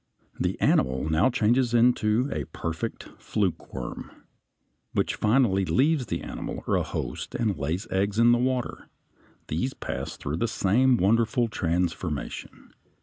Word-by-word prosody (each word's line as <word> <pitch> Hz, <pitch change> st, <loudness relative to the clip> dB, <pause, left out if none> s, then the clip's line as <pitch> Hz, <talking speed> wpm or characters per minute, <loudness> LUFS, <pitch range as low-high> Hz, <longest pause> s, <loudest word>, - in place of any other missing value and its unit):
The -, -, -1 dB
animal 65 Hz, +3 st, +2 dB
now 80 Hz, +11 st, +4 dB
changes 120 Hz, 0 st, +2 dB
into 120 Hz, 0 st, +3 dB
a 75 Hz, -, -3 dB
perfect 80 Hz, +3 st, -4 dB, 0.2 s
flukeworm 90 Hz, -, -3 dB
(F), -, -, -20 dB, 0.8 s
which -, -, +1 dB
finally 105 Hz, -4 st, +2 dB
leaves 135 Hz, -, +2 dB
the 85 Hz, -3 st, -3 dB
animal -, -, -6 dB
or -, -, +1 dB
host -, -, -5 dB
and 110 Hz, -5 st, 0 dB
lays 85 Hz, +9 st, -2 dB
eggs 100 Hz, +2 st, 0 dB
in 115 Hz, +1 st, +6 dB
the 120 Hz, -, +4 dB
water; 125 Hz, -1 st, -2 dB, 0.6 s
these 90 Hz, -, -2 dB
pass -, -, -5 dB
through 75 Hz, +3 st, -3 dB
the 115 Hz, -, 0 dB
same 120 Hz, +6 st, +3 dB
wonderful 115 Hz, +4 st, +2 dB
transformation. 85 Hz, -5 st, -3 dB
105 Hz, 135 wpm, -26 LUFS, 85-120 Hz, 0.8 s, in